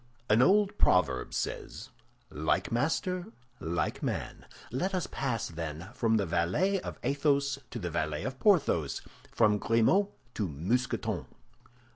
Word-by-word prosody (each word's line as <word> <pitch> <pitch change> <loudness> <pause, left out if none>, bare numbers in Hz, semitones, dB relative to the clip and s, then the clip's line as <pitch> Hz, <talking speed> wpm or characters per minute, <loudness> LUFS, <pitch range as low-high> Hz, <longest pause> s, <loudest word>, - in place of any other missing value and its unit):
An 110 +3 +6
old 205 +6 +4
proverb 70 -9 +3
says, - - -4 0.4
"Like 75 +3 0
master, 175 - 0 0.3
like 85 +1 -2
man." - - -4 0.2
Let 185 +10 -1
us 180 - 0
pass, 125 -5 -2
then, 80 +1 -6
from 115 -1 +2
the 100 - +1
valet 95 - +1
of - - -6
Athos 140 -1 +1
to - - -6
the 90 -6 -4
valet 75 0 -1
of 130 +2 -4
Porthos, 145 - +2 0.3
from 105 -2 +3
Grimaud 115 - +3 0.3
to 105 - -1
Mousqueton. 95 - -1
115 Hz, 130 wpm, -30 LUFS, -, 0.4 s, An